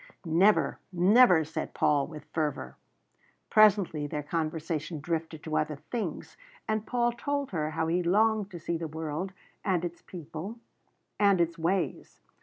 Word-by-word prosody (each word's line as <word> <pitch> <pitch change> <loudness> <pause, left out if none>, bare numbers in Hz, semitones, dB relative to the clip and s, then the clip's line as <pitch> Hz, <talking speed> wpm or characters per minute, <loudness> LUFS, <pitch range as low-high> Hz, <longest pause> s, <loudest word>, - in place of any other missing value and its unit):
"Never, 180 +6 +3
never!" 185 0 +6
said 155 +1 -5
Paul, 145 -2 +2
with 150 -2 -10
fervour. 150 - -2 0.8
Presently 195 -8 +4
their 150 0 -4
conversation 155 0 -3
drifted 160 0 -3
to 155 -1 -3
other 155 0 0
things, 210 - -5 0.3
and 215 0 -1
Paul 240 -1 +1
told 285 +3 -3
her 155 -4 -1
how 160 +1 -1
he 170 +2 +1
longed 210 +3 +2
to 175 -4 -8
see 170 +1 -2
the 165 - -3
world 160 +4 -4 0.3
and 180 -4 +1
its 175 0 -6
people 170 +5 -8 0.6
and 200 -3 +4
its 170 0 +1
ways. 175 +3 -1
170 Hz, 145 wpm, -29 LUFS, 155-200 Hz, 0.8 s, never